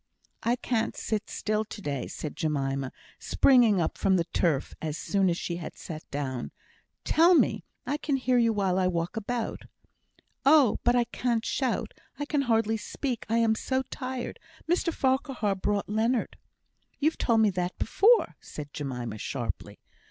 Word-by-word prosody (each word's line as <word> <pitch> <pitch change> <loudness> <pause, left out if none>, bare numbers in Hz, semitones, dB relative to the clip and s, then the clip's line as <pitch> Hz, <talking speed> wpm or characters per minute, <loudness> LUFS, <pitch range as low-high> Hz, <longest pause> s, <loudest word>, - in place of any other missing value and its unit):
"I 235 +1 +2
can't 230 -2 -1
sit 215 -2 -2
still 215 0 -1
to 215 - -9
day," 140 -8 -3
said 155 - -6
Jemima, 135 -3 -1 0.3
springing 240 -7 +4
up 165 - -1
from 190 - +3
the 175 - +2
turf 165 -4 0
as 155 -1 -3
soon 195 0 +1
as 170 - 0
she 170 -1 -3
had 170 - -7
sat 155 -1 -8
down. 130 -3 -3 0.5
"Tell 340 +3 +5
me! - - +2 0.2
I 290 - -1
can 295 -2 -1
hear 255 -1 +2
you 230 -1 +4
while 195 -3 +1
I 185 - +3
walk 170 -1 -1
about." 225 +2 -3 0.8
"Oh! 275 -4 +5
but 240 - +4
I 245 - +4
can't 235 -1 -1
shout; 260 -3 -1 0.2
I 290 - -3
can 290 -1 +1
hardly 225 -3 +2
speak 245 +2 -4
I 230 - +2
am 230 -1 +4
so 260 +4 -1
tired. 255 -2 -5 0.3
Mr 340 0 +1
Farquhar 265 -7 0
brought 200 +1 -1
Leonard 225 +4 0 0.3
" - - -43
"You've 310 +2 +1
told 230 -2 +3
me 215 -2 +4
that 180 0 -2
before," 455 +4 +3
said 145 -1 -8
Jemima, 125 -6 -4
sharply. - - -4
220 Hz, 165 wpm, -28 LUFS, 170-255 Hz, 0.8 s, Tell